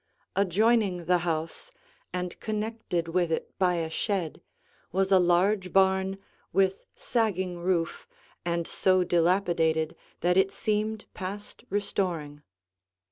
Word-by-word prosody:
Adjoining 200 -1 +2
the 180 +1 +3
house, 165 - -3 0.4
and 180 -1 -4
connected 215 -5 -2
with 175 0 +1
it 160 - -3
by 180 -2 +3
a 165 -1 -1
shed, 185 -4 -2 0.5
was 190 +2 +1
a 190 - +7
large 180 +2 +2
barn 190 0 +3 0.3
with 190 0 +1
sagging 190 -7 -1
roof 170 -1 -1 0.4
and 170 -1 -1
so 185 -1 +3
dilapidated 170 -2 +2 0.3
that 180 +2 +3
it 190 0 +4
seemed 215 0 -1
past 200 +2 -7
restoring. 175 -7 -2
185 Hz, 115 wpm, -28 LUFS, 170-200 Hz, 0.5 s, a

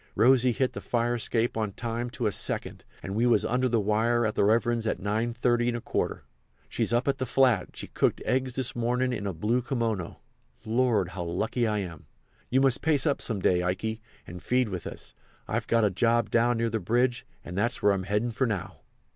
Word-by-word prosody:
"Rosy 125 +1 +5
hit 130 +2 0
the - - -6
fire 120 0 0
escape 120 0 0
on 110 -3 -2
time 120 +2 -3
to 125 -2 -4
a 105 - +2
second, - - -2 0.2
and 95 - -5
we 115 +4 +2
was 115 -4 +3
under 125 +2 +1
the 115 -1 +2
wire 110 +3 +1
at 110 - 0
the - - +1
Reverend's 115 +2 +2
at - - 0
9.30¼. 120 +3 -1 0.5
She's - - -1
up 120 +3 +1
at 140 0 +1
the 130 - -1
flat—she 125 -7 +1
cooked - - +1
eggs 130 -1 0
this 130 0 0
mornin' 125 +2 0
in 100 -4 -3
a 95 - -2
blue 115 +9 0
kimono—Lord! 115 - -2
how 90 -1 -5
lucky 110 +8 -1
I 105 -1 0
am! 85 -5 -8 0.4
You 130 +2 +3
must 135 -3 +2
pace 150 -4 +2
up 145 -3 +1
some 110 -5 -2
day, 90 -1 +3
Ikey, 105 +5 -2 0.2
and 90 0 -9
feed 125 -2 +1
with 90 -3 -5
us. - - -9 0.3
I've - - -2
got 115 -1 +3
a 100 - +2
job 115 +4 +1
down 120 0 +3
near 115 0 0
the 110 - -1
bridge, 120 +2 +1 0.2
and 90 - -7
that's 120 +6 -1
where 105 - +5
I'm 95 -1 -3
heading 105 +4 0
for 130 +3 0
now." 100 -5 -4
115 Hz, 200 wpm, -27 LUFS, 105-125 Hz, 0.5 s, Rosy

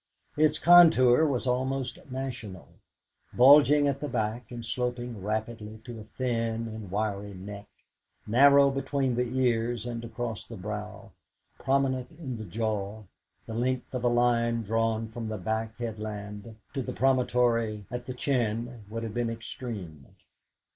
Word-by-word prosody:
Its 155 0 +3
contour 160 -5 +7
was 130 -4 -1
almost 130 0 -1
national. 125 -8 -6 0.7
Bulging 145 +3 +7
at 140 -1 -1
the 145 - -3
back, 110 +3 -2
and 120 -2 -7
sloping 120 -2 -3
rapidly 110 +1 -4
to 120 -3 -8
a - - -8
thin 115 -1 -2
and 110 -3 -7
wiry 100 0 -2
neck, 100 +2 -9 0.6
narrow 140 +5 +6
between 135 -1 -1
the 125 +1 0
ears 120 -2 +1
and 120 -1 -4
across 115 -1 -4
the 115 - -10
brow, 105 +1 -6 0.5
prominent 130 -1 0
in 135 -8 -5
the 110 - -7
jaw, 105 +1 -3 0.4
the 115 - -7
length 125 +3 -2
of 125 -1 -3
a - - +3
line 120 -1 +2
drawn 115 +1 0
from 115 0 -6
the 110 0 -3
back 110 +3 -3
headland 105 -1 -6 0.2
to 135 - -2
the - - -5
promontory 120 -3 +1
at 125 0 -5
the 130 - -4
chin 120 -3 -1
would 115 +1 -4
have 110 -2 -5
been 120 0 -1
extreme. 110 - -7
115 Hz, 145 wpm, -28 LUFS, 110-130 Hz, 0.7 s, contour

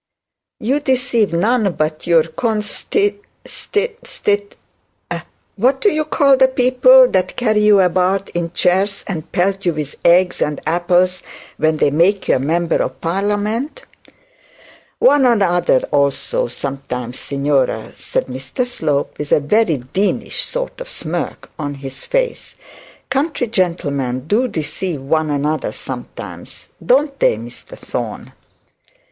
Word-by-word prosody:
'You 265 +7 0
deceive 250 -6 +1
none 205 +3 +1
but 155 0 -2
your 165 -2 +5
consti 220 - -1 0.3
stit 460 +3 -2
stit; 205 - -1 1.0
what 260 +6 +2
do 415 - +3
you 310 -2 -1
call 280 -2 +4
the 260 0 +6
people 255 0 +5
that 185 -1 0
carry 215 -3 +1
you 210 -1 +6
about 185 +2 +1
in 170 -1 -3
chairs 190 +3 +1
and 165 -4 -5
pelt 195 +2 0
you 175 - +1
with 150 -2 -4
eggs 180 +1 +4
and 150 -1 0
apples 175 +2 +2 0.4
when 155 0 +1
they 145 - +2
make 180 +6 +2
you - - +4
a - - -3
member 165 +5 +1
of - - -3
parliament?' 210 - -2 1.1
'One 290 - +5
another 180 - +3
also, 140 -4 +1
sometimes, 125 -1 -5
signora,' 140 0 -1
said - - -2
Mr 130 - -4
Slope, 155 -12 -2
with 150 -1 -5
a - - +5
deanish 165 - 0
sort - - -3
of - - -7
smirk - - -5
on 145 -1 -3
his 135 -1 -8
face. - - -2 0.6
'Country 275 -1 0
gentlemen 145 - -1
do 225 +10 +2
deceive 170 - -3
one 155 +3 0
another 150 +2 -1
sometimes, - - -8
don't 275 +2 +2
they, - - +3
Mr 115 +2 -11
Thorne?' - - -6
185 Hz, 130 wpm, -18 LUFS, 155-245 Hz, 1.1 s, the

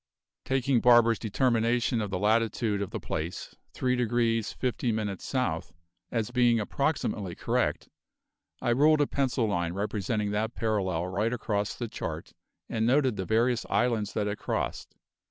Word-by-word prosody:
Taking 130 -2 +1
Barber's 120 -2 +5
determination 120 +1 +1
of 105 - -3
the 95 - -2
latitude 110 0 +1
of 100 - -3
the - - -4
place, 85 +4 -5 0.2
3 125 -1 0
degrees 115 -2 +1
50 125 -1 -1
minutes 105 -3 -3
South, 90 -11 -2 0.4
as 115 -1 -1
being 120 -2 +3
approximately 105 - -1
correct, - - -1 0.8
I 120 - +2
ruled 150 +5 +4
a - - +4
pencil 135 -4 0
line 85 -5 -1
representing 105 +1 -2
that 110 +3 -1
parallel 95 -6 0
right 100 +5 -1
across 105 -4 -2
the 120 - -4
chart - - -6 0.3
and 110 -1 -1
noted 130 -2 +3
the 95 - -3
various 115 +4 +2
islands 115 -4 +1
that 105 -1 -1
it 105 0 -3
crossed. - - -3
115 Hz, 150 wpm, -28 LUFS, 105-125 Hz, 0.8 s, Barber's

